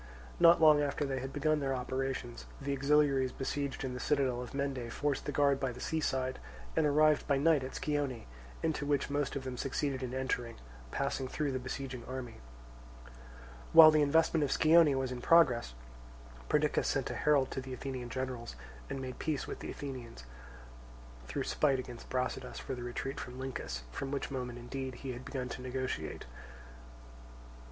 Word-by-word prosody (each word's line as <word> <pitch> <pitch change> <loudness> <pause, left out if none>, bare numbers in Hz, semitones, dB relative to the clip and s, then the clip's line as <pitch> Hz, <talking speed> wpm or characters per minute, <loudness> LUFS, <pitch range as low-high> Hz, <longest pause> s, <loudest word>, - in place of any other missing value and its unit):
Not 170 0 +7
long 155 -2 +7
after 145 0 -1
they 135 -1 -2
had 135 +1 -5
begun 155 +1 +1
their 135 -2 -1
operations, 130 -1 -3
the 140 0 -2
auxiliaries 140 -2 +3
besieged 140 +1 -3
in 130 -1 -3
the 125 - -5
citadel 130 -3 +1
of 125 +2 -8
Mende 135 -4 -2
forced 145 +1 -1
the 145 - -2
guard 140 -1 +3
by 135 -2 -1
the 125 - -10
sea 160 +4 -1
side 130 -3 -1 0.4
and 150 - +3
arrived 150 +1 +4
by 140 -2 +3
night 150 -1 +3
at 130 - -6
Scione, 145 -6 -2 0.4
into 160 -2 0
which 145 -1 0
most 145 -1 -1
of 140 - -3
them 130 -1 -5
succeeded 135 0 -2
in 125 -1 -3
entering, 125 -3 -2 0.3
passing 140 - -2
through 145 +2 -2
the 130 - -2
besieging 130 -1 -5
army. 130 -3 -6 1.4
While 160 -1 +11
the 155 -1 +4
investment 160 +2 +3
of 140 - 0
Scione 160 -2 +5
was 135 -1 -1
in 125 -1 -5
progress, 125 - +4 0.7
Perdiccas 150 0 +2
sent 135 -2 0
a - - -4
herald 145 -3 +2
to 130 - -3
the 130 0 -9
Athenian 130 -2 -5
generals 125 - -4 0.3
and 135 - -3
made 130 -1 -6
peace 155 -3 -1
with - - -6
the - - -6
Athenians, 125 - -7 1.0
through - - -2
spite 140 -3 +2
against 125 -2 -8
Brasidas 130 0 -2
for - - -5
the 125 - -5
retreat 120 +2 -4
from 125 0 -7
Lyncus, 120 - -5
from 135 - -4
which 140 0 -3
moment 125 -2 -4
indeed 130 +1 -5
he 130 - -2
had 125 +1 -7
begun 130 -2 -4
to 125 - -6
negotiate. 130 -11 -4
135 Hz, 180 wpm, -33 LUFS, 125-145 Hz, 1.4 s, While